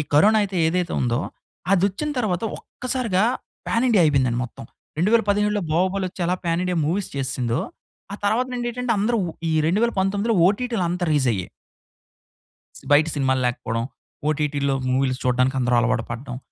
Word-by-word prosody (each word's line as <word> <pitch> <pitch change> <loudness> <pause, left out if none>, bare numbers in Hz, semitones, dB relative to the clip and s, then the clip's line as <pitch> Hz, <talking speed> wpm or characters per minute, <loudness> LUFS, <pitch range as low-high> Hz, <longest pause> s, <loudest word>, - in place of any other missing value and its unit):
Corona 210 +9 +6
అయితే 195 -2 -3
ఏదైతే 175 +1 0
ఉందో, 120 -1 +1 0.5
అదొచ్చిన 200 +10 +1
తర్వాత 190 -6 -1 0.2
ఒక్కసారిగా 240 -6 -2 0.4
పాన్ 230 +2 +1
ఇండియా 215 -7 +5
అయిపోయింది 135 -5 +3
మొత్తం. 120 - -10 0.3
2017 210 0 +2
బాహుబలి 185 +3 +1
వచ్చి 180 - -13
ఎలా 180 - +1
పాన్ 170 +1 0
ఇండియా 180 -1 -1
మూవీస్ 190 +4 -1
చేసేసిందో. 130 -3 -1 0.5
ఆ - - -4
తర్వాత 230 +5 +2
నుండి 240 -1 -2
ఏంటంటే, 250 0 -1
అందరూ 230 +3 +1 0.3
ఈ - - +1
2019 205 +2 +1
ఓటీటీ‌లు 230 -1 -1
అంతా 175 0 -1
రేజ్ 140 -4 +2
అయ్యాయి. 95 -4 -3 1.4
బయట 150 +2 +6
సినిమాలు 130 -1 +1
లేకపోవడం. 115 -2 -2 0.5
ఓటీటీ‌లో 145 -2 0
మూవీస్‌లు 130 0 +1
చూడడానికి 125 +1 +2
అందరు 125 0 +1
అలవాటు 125 0 +1
పడ్డం. 125 +1 -5
180 Hz, 140 wpm, -23 LUFS, 135-210 Hz, 1.4 s, Corona